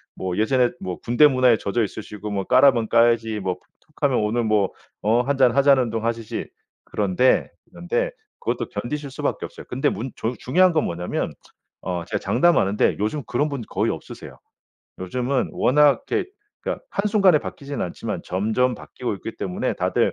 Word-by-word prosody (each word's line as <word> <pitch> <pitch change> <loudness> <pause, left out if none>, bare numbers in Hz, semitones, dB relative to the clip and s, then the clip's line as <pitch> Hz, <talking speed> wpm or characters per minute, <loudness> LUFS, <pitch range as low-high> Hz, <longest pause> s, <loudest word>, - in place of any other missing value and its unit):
뭐 95 0 -3
예전에 125 +2 +3
뭐 90 -2 -5
군대 120 +6 +5
문화에 130 -4 +4
젖어 110 +3 -1
있으시고 105 0 -6
뭐 100 -2 -2
"까라면 125 -3 +5
까야지." 115 -2 +3
뭐 90 -1 -2 0.2
툭하면 145 -4 -1
"오늘 110 +3 0
뭐 105 -3 +2 0.3
어 115 +4 +3
한잔하자."는 135 -1 +3
둥 115 0 -3
하시지. 115 -2 -3 0.4
그런데, 105 +5 +2 0.2
그런데 - - -1 0.3
그것도 - - -2
견디실 145 +2 -4
수밖에 - - -2
없어요. - - -11
근데 - - +1
문 120 +7 -4
종 115 +3 -2
중요한 180 +8 +4
건 155 - +2
뭐냐면 85 +1 -3 0.5
어 90 -2 -3
제가 - - -2
장담하는데 105 - +2
요즘 125 +7 -1
그런 145 +5 0
분들 135 -6 -5
거의 - - 0
없으세요. - - -9 0.6
요즘은 125 +8 -1
워낙 145 +2 +3
이렇게 395 -3 0 0.3
그러니까 - - -4
한순간에 200 -5 +3
바뀌지는 140 -1 -6
않지만 - - -5
점점 110 +7 0
바뀌고 125 -4 -5
있기 110 - -8
때문에 90 -1 -2
다들 - - +1
120 Hz, 370 characters per minute, -23 LUFS, 105-140 Hz, 0.6 s, 군대